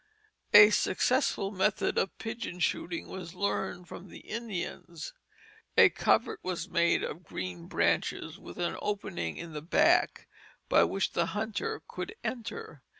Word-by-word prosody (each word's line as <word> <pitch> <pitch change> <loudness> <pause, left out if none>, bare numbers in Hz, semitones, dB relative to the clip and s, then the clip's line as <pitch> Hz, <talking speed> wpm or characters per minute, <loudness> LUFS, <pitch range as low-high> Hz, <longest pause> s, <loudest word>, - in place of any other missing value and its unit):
A 210 +1 +11
successful 210 -1 +1
method 200 +1 +1
of 195 - -2
pigeon 225 -5 -5
shooting 170 -1 -1
was 180 -2 -8
learned 180 -2 -2
from 185 - -9
the - - -11
Indians. 185 -7 -5 0.6
A - - +9
covert - - +1
was 180 -1 -3
made 170 -2 +2
of 170 +5 -5
green 90 - -6
branches - - 0
with - - -11
an 175 -1 -1
opening 140 - -3
in 170 -1 -7
the 150 - -5
back 160 - +3 0.4
by - - +6
which 195 - -1
the 170 -1 +1
hunter 225 - -3
could 435 - -6
enter. 220 - -5
185 Hz, 140 wpm, -30 LUFS, 170-210 Hz, 0.6 s, A